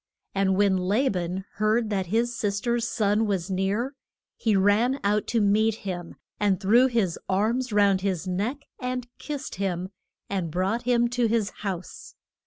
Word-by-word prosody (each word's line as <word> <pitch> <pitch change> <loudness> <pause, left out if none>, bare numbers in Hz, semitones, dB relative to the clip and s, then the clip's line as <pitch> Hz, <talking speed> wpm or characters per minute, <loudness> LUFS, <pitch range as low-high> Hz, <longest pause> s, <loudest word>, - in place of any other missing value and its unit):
And 195 -1 +2
when 200 -2 +3
La 205 +9 +2
ban 180 0 -3
heard 215 +1 +1
that 190 -3 -1
his 235 +5 0
sis 200 -1 -1
ter's 235 +1 0
son 215 -1 +1
was 190 -2 -1
near, 200 +8 0 0.4
he 220 -3 +1
ran 210 +7 +3
out 210 +1 +1
to 230 - +1
meet 210 +2 +3
him, 175 -3 -5 0.2
and 200 -3 +2
threw 230 +6 +5
his 225 -9 0
arms 225 +6 +1
round 200 -2 +3
his 190 -2 -2
neck 220 +11 -2
and 250 -1 -3
kissed 290 -9 -5
him, 185 -2 -2 0.4
and 185 -4 -2
brought 190 +9 -1
him 240 -1 +4
to 245 -1 +1
his 220 -2 0
house. 190 -3 -6
205 Hz, 165 wpm, -26 LUFS, 190-235 Hz, 0.4 s, threw